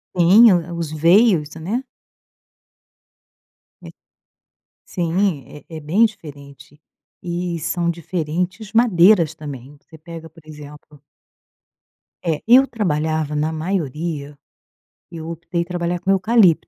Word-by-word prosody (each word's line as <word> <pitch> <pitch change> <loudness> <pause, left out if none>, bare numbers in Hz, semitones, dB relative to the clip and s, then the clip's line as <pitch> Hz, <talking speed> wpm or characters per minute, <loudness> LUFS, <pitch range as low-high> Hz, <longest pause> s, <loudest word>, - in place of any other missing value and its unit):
Sim, 195 +6 +6
o 175 -1 -1
o - - -6
os 160 -3 -4
veios, 165 0 +3
né. 200 +11 -4 2.0
É - - -10 1.0
sim, 175 -2 -1 0.2
é 160 - -9
é - - -6
bem 170 +10 +2
diferente. 145 -7 -10 0.4
E 175 -1 -3
são 170 +2 -2
diferentes 180 +5 -4
madeiras 180 -7 +4
também, 145 -2 -10
você 160 +2 -17
pega, 165 0 -11
por 165 +1 -19
exemplo 150 -1 -13 1.2
É, 160 -3 -1
eu 265 - +7
trabalhava 155 - -2
na 150 +2 -1
maioria 155 -3 -4 0.7
eu 165 -1 -8
optei 170 +1 -4
trabalhar 175 0 -3
com 195 +1 0
eucalipto. 195 -3 +3
170 Hz, 110 wpm, -20 LUFS, 155-185 Hz, 2.0 s, eu